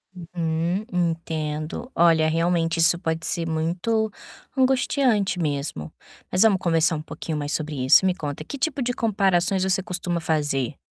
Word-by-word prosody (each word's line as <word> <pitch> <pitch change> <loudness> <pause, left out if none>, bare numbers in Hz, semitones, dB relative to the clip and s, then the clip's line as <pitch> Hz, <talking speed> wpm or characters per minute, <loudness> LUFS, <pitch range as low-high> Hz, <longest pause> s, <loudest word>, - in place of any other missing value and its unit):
Uhum. 170 +2 -2
Entendo. 165 - -3
Olha, 165 -2 +4
realmente 165 0 +1
isso 165 +1 +5
pode 160 -1 -3
ser 170 -2 -1
muito 175 +8 -1 0.4
angustiante 255 -7 +2
mesmo. 140 - -3 0.4
Mas 180 - +2
vamos 210 -4 +5
conversar 165 -2 +2
um 150 - -4
pouquinho 155 0 -5
mais 145 0 -3
sobre 150 -5 -2
isso. 135 - +6
Me 185 -1 +2
conta, 145 -2 -5
que 280 - -7
tipo 280 0 -1
de 245 0 -1
comparações 195 -4 +1
você 190 0 +1
costuma 180 -3 -2
fazer? 145 -5 -1
170 Hz, 150 wpm, -23 LUFS, 160-190 Hz, 0.4 s, isso